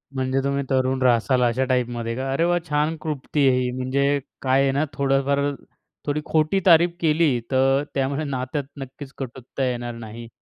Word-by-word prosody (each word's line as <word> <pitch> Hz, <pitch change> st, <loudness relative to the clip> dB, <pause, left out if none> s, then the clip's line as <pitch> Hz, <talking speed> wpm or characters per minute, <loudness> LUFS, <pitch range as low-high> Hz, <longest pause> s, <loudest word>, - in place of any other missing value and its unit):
म्हणजे 130 Hz, +1 st, 0 dB
तुम्ही 140 Hz, 0 st, 0 dB
तरुण 130 Hz, 0 st, +1 dB
राहशाल 125 Hz, +1 st, +3 dB
अशा 120 Hz, +2 st, +1 dB
टाइपमध्ये 120 Hz, -2 st, -1 dB
का? 135 Hz, +1 st, -3 dB
अरे 140 Hz, +5 st, +1 dB
वाह! 175 Hz, 0 st, +2 dB
छान 150 Hz, +2 st, +1 dB
क्लृप्ती 145 Hz, -1 st, 0 dB
आहे 130 Hz, -1 st, +3 dB
ही. 125 Hz, -1 st, 0 dB
म्हणजे 140 Hz, +3 st, 0 dB, 0.2 s
काय 135 Hz, 0 st, +3 dB
आहे 135 Hz, -1 st, +2 dB
ना 140 Hz, +3 st, +1 dB
थोडंफार 140 Hz, 0 st, +1 dB, 0.7 s
थोडी 150 Hz, +1 st, -1 dB
खोटी 155 Hz, +5 st, +2 dB
तारीफ 170 Hz, 0 st, +5 dB
केली 155 Hz, -5 st, +2 dB
तर 135 Hz, +2 st, +3 dB
त्यामुळे 140 Hz, +3 st, 0 dB
नात्यात 135 Hz, +1 st, -3 dB, 0.2 s
नक्कीच 135 Hz, +1 st, -9 dB
कटुता 130 Hz, 0 st, -5 dB
येणार 120 Hz, -1 st, -4 dB
नाही. 115 Hz, 0 st, -9 dB
135 Hz, 165 wpm, -23 LUFS, 130-145 Hz, 0.7 s, तारीफ